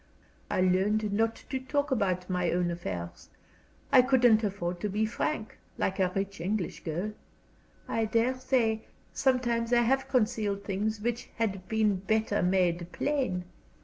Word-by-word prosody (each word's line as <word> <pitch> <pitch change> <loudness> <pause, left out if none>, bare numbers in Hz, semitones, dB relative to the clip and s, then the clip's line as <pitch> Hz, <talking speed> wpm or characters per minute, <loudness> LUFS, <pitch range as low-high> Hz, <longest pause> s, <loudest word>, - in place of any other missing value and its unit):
I - - +1
learned 200 +3 +2
not 225 +2 +1 0.2
to 265 - -1
talk 285 +2 -1
about 185 -7 0
my 180 -2 0
own 175 0 +1
affairs. 90 - -6 0.6
I 255 - +8
couldn't 245 -4 +4
afford 180 -4 -2
to 210 - -2
be 210 +3 +1
frank, 220 +1 -3 0.2
like 190 - -1
a 185 -1 +2
rich 195 -2 -3
English 190 0 -2
girl. 175 +6 -2 0.8
I 225 - 0
dare 230 +4 +2
say, 230 -4 +1 0.3
sometimes 240 -3 +1
I 240 -1 +5
have 270 +3 +1
concealed 215 -6 0
things 210 +2 -2
which 235 +1 -2
had 195 -5 -2
been 215 -3 +2
better 215 +2 0
made 180 -2 +1
plain. 255 -12 -1
210 Hz, 145 wpm, -29 LUFS, 185-235 Hz, 0.8 s, I